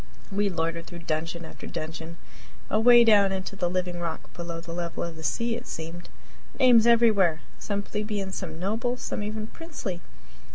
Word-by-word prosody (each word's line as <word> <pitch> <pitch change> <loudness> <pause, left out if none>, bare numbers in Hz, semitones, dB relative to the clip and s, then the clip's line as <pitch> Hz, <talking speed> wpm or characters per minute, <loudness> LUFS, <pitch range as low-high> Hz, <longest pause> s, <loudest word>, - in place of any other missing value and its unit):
We 200 +1 +1
loitered 165 -1 -2
through 170 -1 -9
dungeon 165 +2 -2
after - - -10
dungeon, 160 +1 -6 0.5
away 240 +2 +7
down 205 -4 +6
into 190 +1 -3
the 175 -3 0
living 180 -1 -2
rock 170 -2 -5
below 170 -1 -5
the 165 0 -8
level 170 -1 -3
of 170 -1 -5
the 160 - -10
sea, 230 +11 0
it 240 +1 -7
seemed. 165 +2 -7 0.5
Names 240 -4 +7
everywhere! 210 -9 +5 0.2
some 205 -1 -2
plebeian, 210 -2 -3
some 165 -4 -5
noble, 225 +7 -1
some 245 - -4
even 215 +1 -3
princely. 225 - -6
190 Hz, 165 wpm, -27 LUFS, 170-215 Hz, 0.5 s, away